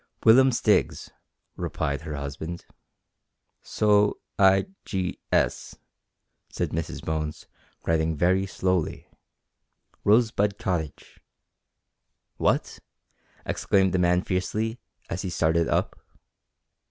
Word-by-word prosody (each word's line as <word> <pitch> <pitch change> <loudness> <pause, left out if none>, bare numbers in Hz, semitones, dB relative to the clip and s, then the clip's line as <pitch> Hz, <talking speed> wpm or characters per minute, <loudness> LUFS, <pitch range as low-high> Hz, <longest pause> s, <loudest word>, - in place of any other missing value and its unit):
"Willum 130 +4 +7
Stiggs," 115 -3 +1 0.4
replied 70 0 -3
her 75 - -6
husband. 80 +5 -6 1.0
"So 105 -1 +2 0.2
i 95 0 +5 0.2
g 95 -2 -3
s," - - 0 0.7
said - - -3
Mrs 80 0 -4
Bones, 75 -1 -3 0.4
writing 80 0 +1
very 95 +4 +2
slowly, 90 -4 -1 1.0
"Rosebud 105 -2 +3
Cottage." 85 -7 -4 1.2
"What!" - - 0 0.7
exclaimed 95 -1 +1
the 95 - +2
man 90 +1 +3
fiercely, 110 +5 -2 0.3
as 85 - -4
he 95 - -3
started 85 -1 +1
up. - - -1
90 Hz, 90 wpm, -26 LUFS, 80-100 Hz, 1.2 s, Willum